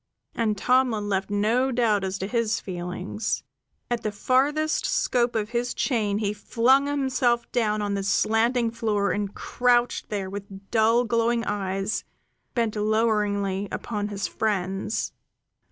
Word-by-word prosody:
And 215 -3 0
Tomlin 240 -3 +2
left 195 0 -1
no 225 +6 +2
doubt 225 -5 +2
as 190 0 -2
to 190 - -3
his 230 0 0
feelings. 180 +3 -4 0.5
At 240 -1 0
the 215 - -2
farthest 285 +8 +1
scope 250 - +1
of 215 0 -1
his 245 0 -1
chain 215 -6 0
he 210 -1 -1
flung 255 +6 +3
himself 265 -4 +1
down 215 -3 +1
on 205 -1 -1
the 200 - -1
slanting 225 +4 +2
floor 215 -4 0
and 205 -1 -2
crouched 245 -1 +1
there 200 -3 -2
with 195 0 -9
dull 230 +2 +4
glowing 230 0 +1
eyes 195 +1 -2 0.5
bent 230 -3 0
loweringly 210 -2 +1
upon 205 -2 -3
his 200 -3 -3
friends. 195 0 -2
215 Hz, 135 wpm, -25 LUFS, 205-240 Hz, 0.5 s, dull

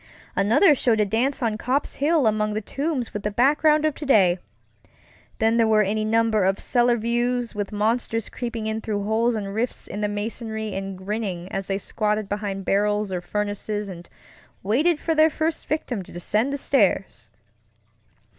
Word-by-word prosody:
Another 230 - +5
showed 240 -5 +1
a 210 - +4
dance 245 +7 0
on 220 -2 -1
Copp's 265 +6 -1
Hill 300 0 +2
among 215 -1 +1
the - - 0
tombs 275 +1 -3
with 210 - -3
the 210 - -1
background 300 +7 +3
of 310 - +2
today. 200 - +3 1.0
Then 225 +1 +2
there 230 -1 +4
were 215 -1 +4
any 215 +2 -1
number 220 -1 +2
of 190 +1 +1
cellar 240 -1 +2
views, 240 +1 -1
with 205 -1 -4
monsters 225 +1 0
creeping 235 -3 -5
in 220 0 -2
through 205 -2 -2
holes 225 +3 +1
and 200 -2 -4
rifts 235 +4 -2
in 205 - -5
the 210 - +1
masonry 220 +1 -4
and 195 0 -5
grinning 190 -2 -4
as 195 0 -3
they 195 - 0
squatted 210 +1 -1
behind 200 -2 -4
barrels 205 0 +1
or 180 -1 -2
furnaces 210 +1 -3
and 175 -2 -10 0.5
waited 295 - +2
for 325 - 0
their 315 0 +5
first 320 +1 -2
victim 280 -8 -2
to 180 - -12
descend 215 +9 0
the 280 - -2
stairs. 195 - +1
220 Hz, 175 wpm, -24 LUFS, 205-245 Hz, 1.0 s, Another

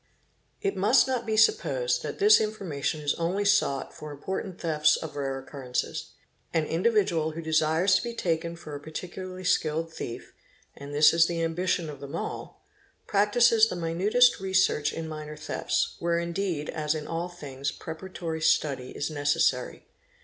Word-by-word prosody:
It 195 - 0
must 205 +9 +4
not 250 -3 -2
be 220 -1 0
supposed - - +2
that - - -5
this 420 +2 +6
information 180 -9 -2
is 145 -1 +1
only 185 +5 0
sought 200 -10 +2
for 150 - -9
in 145 - -9
im - - -22
portant 190 -1 -4
thefts 155 -2 +3
of 160 -2 -6
rare 135 -2 -2
occurences; 130 -2 -4 0.4
an 160 -2 +2
individual 170 -3 +1
who 165 - -5
desires 160 +4 +2
to - - +4
be 235 -1 -5
taken 170 -3 -1
for 155 -3 -10
a 145 - -5
particularly 185 +4 -7
skilled 165 -2 0
thief—and 140 +4 -10
this 150 +2 +6
is 165 0 +5
the 170 -1 -2
ambition 170 +1 0
of 145 -2 -8
them 140 0 -7
all— - - -6 0.4
practises 220 +2 +4
the - - -4
minutest 185 +10 +3
researches 190 -6 +1
in 165 -1 -4
minor 150 -1 -7
thefts, 150 - -2
where 170 0 +1
indeed 170 -2 -2
as 150 0 -1
in 150 -1 -5
all 170 +2 -3
things 140 -5 -5
preparatory 160 -1 -6
study 145 -5 +1
is 145 - -4
necessary. 145 -1 0
165 Hz, 165 wpm, -27 LUFS, 150-190 Hz, 0.4 s, this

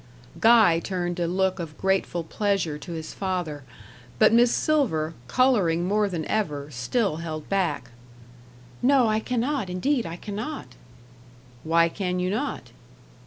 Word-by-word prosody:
Guy 220 -8 +6
turned 175 0 -3
a 170 - 0
look 190 +1 0
of 160 -3 -6
grateful 190 -3 0
pleasure 180 -4 -1
to 150 - -9
his 160 -1 -6
father; 180 -6 -3 0.6
but - - +5
Miss 235 +1 +5
Silver, 185 - +1
colouring 190 - +2
more 205 +2 +1
than 165 -4 -3
ever, 150 -9 -2
still 155 - -1
held 155 -2 -6
back. 160 -11 -1 0.9
"No, 260 -2 +4
I 215 0 +2
cannot; 250 -1 -1
indeed 235 +5 0
I 165 - -6
cannot." 210 - -6 0.9
"Why 165 +1 +3
can 180 +1 -3
you 180 +1 -1
not?" 260 +8 -3
185 Hz, 135 wpm, -25 LUFS, 165-220 Hz, 0.9 s, Guy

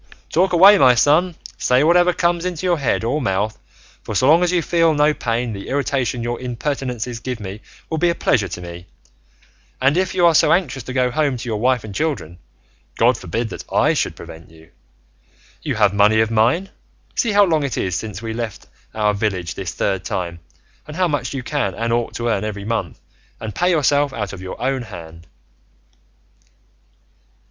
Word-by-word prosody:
Talk 185 +3 +3
away, 195 +4 +7
my 125 -2 +6
son, 155 +8 +3 0.2
say 125 +2 +3
whatever 175 +2 +4
comes 170 -1 0
into 180 -1 -3
your 175 -3 +2
head 135 -4 0
or 140 +7 -1
mouth, 105 -1 -1 0.4
for 110 - -6
so 130 - +3
long 160 +4 +6
as 180 -1 +2
you 175 -2 +1
feel 165 -2 +2
no 150 +1 +3
pain, 115 -3 -2
the 100 -1 -8
irritation 130 -3 -1
your 120 0 -3
impertinences 125 -2 -3
give 125 -1 -5
me 100 +1 -7 0.3
will 160 - -3
be 175 +2 +3
a 170 - 0
pleasure 105 - +1
to 90 0 -7
me; 85 0 -9 0.9
and 135 +3 +3
if 185 0 0
you 180 -2 +4
are 170 - +6
so - - +4
anxious 140 -8 0
to 125 - -7
go 125 -1 +1
home 145 -2 0
to 120 +1 -7
your 110 -2 -2
wife 125 0 +1
and 105 -2 -8
children, 115 - -3 0.6
God 120 +2 +4
forbid 110 +4 -3
that - - -7
I - - +3
should - - -1
prevent 80 0 -12
you; 80 0 -19 0.9
you - - -2
have 105 -2 +3
money 105 +2 +4
of 110 0 +2
mine; 120 - +2 0.4
see 230 -3 0
how 205 0 +6
long 160 -4 +1
it 140 -4 -3
is 90 -2 -1
since 105 +1 -5
we 110 -1 -4
left 115 -2 -5 0.3
our 105 -1 +2
village 95 -5 -2
this 95 -3 -5
third 95 -2 -1
time, 85 -2 -4 0.5
and 150 +1 -8
how 185 -1 +2
much 140 -4 -2
you 130 - -4
can 120 - -2
and 115 0 -1
ought 120 -1 -1
to 120 - -2
earn 110 -4 0
every 105 -2 -5
month, 110 -7 -3 0.4
and 110 -2 -6
pay 180 - +1
yourself 145 -4 +2
out 105 -6 -4
of 95 - -8
your 95 - -7
own 130 0 -1
hand." 85 -6 -11
125 Hz, 195 wpm, -20 LUFS, 105-150 Hz, 0.9 s, away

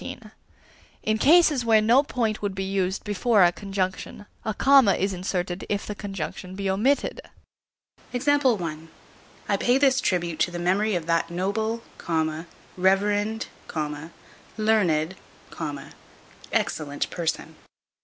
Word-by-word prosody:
In 215 0 0
cases 305 -3 +5
where 225 -2 +5
no 230 +5 +5
point 230 -6 -2
would 200 -2 -2
be 195 - -2
used 190 -1 -1
before 210 0 +3
a 175 - +5
conjunction, 195 +1 -4 0.2
a 220 - -1
comma 265 -7 +5
is 195 +1 -1
inserted 180 0 -3
if 205 -1 -1
the 210 - -4
conjunction 190 -2 -6
be 195 0 -3
omitted. 250 +9 +1 0.9
I 240 - +1 0.7
pay 245 +2 +3
this 270 -1 +3
tribute 175 -6 -1
to - - +2
the 175 - -6
memory 190 +4 +1
of 170 -2 -2
that 165 0 +1
noble, 220 +6 -2 0.9
reverend, 205 +4 +1 1.1
learned, 190 -7 +2 1.4
excellent 145 -2 -1
person. 170 -2 -3
200 Hz, 115 wpm, -25 LUFS, 180-225 Hz, 1.4 s, cases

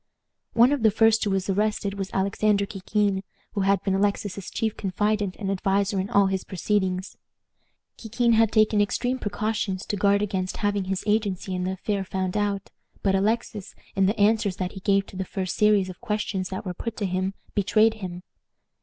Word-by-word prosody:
One 240 +3 +6
of 290 -3 0
the 220 - +6
first 225 +1 +4
who 205 - 0
was 195 -1 0
arrested 205 0 0
was 195 -1 -4
Alexander 200 +1 +1
Kikin, 200 0 -1 0.3
who 200 - -2
had 195 0 +2
been 195 - 0
Alexis's 200 -1 -1
chief 220 -1 -2
confidant 205 0 -1
and 195 -2 -3
adviser 195 0 +1
in 190 +2 -2
all 200 -4 +4
his 190 -1 -1
proceedings. 185 0 -1 0.8
Kikin 235 +1 +1
had 225 -1 +4
taken 215 -1 +4
extreme 245 +5 0
precautions 210 -3 -2
to - - -2
guard 200 +1 +3
against 190 -2 -2
having 205 -2 0
his 190 0 -2
agency 205 -3 0
in 180 0 -2
the 185 - -1
affair 195 +1 -2
found 185 0 -3
out; 205 -1 -1 0.3
but 195 - +2
Alexis, 210 0 -1 0.2
in 195 -1 +3
the 210 +3 -1
answers 205 -2 +3
that 185 0 -3
he 190 - -8
gave 195 0 +2
to - - -13
the 190 - -2
first 185 -1 -4
series 210 -3 +4
of 185 -1 -10
questions 205 -3 -2
that 190 +2 -5
were 180 - -3
put 230 +5 -5
to 205 - -1
him, 185 +1 -1 0.2
betrayed 215 +2 +3
him. 180 -4 -7
200 Hz, 190 wpm, -25 LUFS, 190-215 Hz, 0.8 s, One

